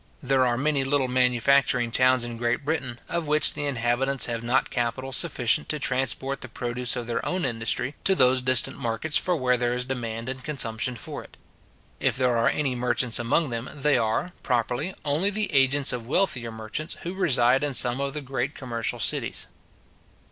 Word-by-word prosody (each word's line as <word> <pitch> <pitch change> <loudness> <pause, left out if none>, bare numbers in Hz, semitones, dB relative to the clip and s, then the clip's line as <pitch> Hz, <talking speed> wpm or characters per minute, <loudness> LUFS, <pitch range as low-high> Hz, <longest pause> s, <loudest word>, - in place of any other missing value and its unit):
There 130 -1 +2
are 120 -1 0
many 145 +1 0
little 135 -1 +1
manufacturing 125 0 +2
towns 130 0 +3
in 120 -1 -6
Great 120 +3 -1
Britain, 135 -6 -2
of 170 -2 -2
which 150 -1 +5
the 145 - -4
inhabitants 130 +1 +1
have 115 -1 -3
not 125 +3 0
capital 120 +3 -2
sufficient 130 +2 +2
to 155 - -1
transport 135 0 -1
the - - -7
produce 120 0 -2
of 120 -1 -4
their 115 0 -3
own 180 0 -2
industry 115 +3 -1
to 190 - +4
those 130 -3 +4
distant 130 0 +3
markets 120 +7 0
where 130 -8 +2
there 120 0 -1
is 125 0 -1
demand 115 -3 -4
and 130 0 -5
consumption 125 -4 -1
for 115 - -6
it. - - -18 0.6
If - - 0
there 125 -2 +2
are 115 - +3
any 140 -4 -1
merchants 125 -1 0
among 125 +5 0
them, 115 +1 -4
they 145 +1 +2
are, 115 +9 0
properly, 125 +7 -1
only 150 +7 +1
the 205 -3 -1
agents 135 0 +4
of 120 -2 -5
wealthier 130 -7 0
merchants 110 +8 -5
who 175 - -4
reside 135 -8 +2
in 145 -3 -1
some 125 +2 +4
of 140 0 -3
the 150 - -3
great 135 +1 -3
commercial 115 -4 -3
cities. - - -1
130 Hz, 185 wpm, -25 LUFS, 120-140 Hz, 0.6 s, which